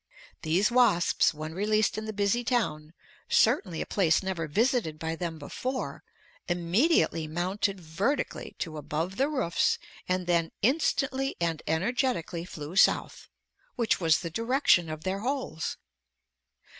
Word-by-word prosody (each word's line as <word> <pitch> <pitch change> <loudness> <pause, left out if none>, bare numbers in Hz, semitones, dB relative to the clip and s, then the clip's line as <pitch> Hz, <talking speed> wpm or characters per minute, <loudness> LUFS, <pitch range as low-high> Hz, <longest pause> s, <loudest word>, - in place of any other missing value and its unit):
These 180 +8 +2
wasps 235 -8 +4
when 155 +1 -7
released 215 +4 +1
in 215 - -4
the 220 - -3
busy 205 +3 0
town, 165 -11 -1 0.4
certainly 175 -6 +2
a - - -2
place 175 -3 +2
never 180 -4 -2
visited 220 - +1
by 160 +1 -3
them 165 -1 -4
before, 255 - -4 0.5
immediately 175 - +2
mounted 185 +4 -1
vertically 180 - -2
to 160 -3 -4
above 160 +5 -3
the 275 +2 +2
roofs 255 - +1 0.3
and 185 0 0
then 170 -2 +1
instantly 270 0 +1
and 165 -2 -1
energetically 175 - -1
flew 155 -1 -8
south, 195 - +2 0.5
which 235 -3 +1
was 160 -2 +3
the 170 -2 -5
direction 230 - +2
of 155 0 -6
their 190 +1 -2
holes. 250 - -3
185 Hz, 130 wpm, -28 LUFS, 165-235 Hz, 0.5 s, wasps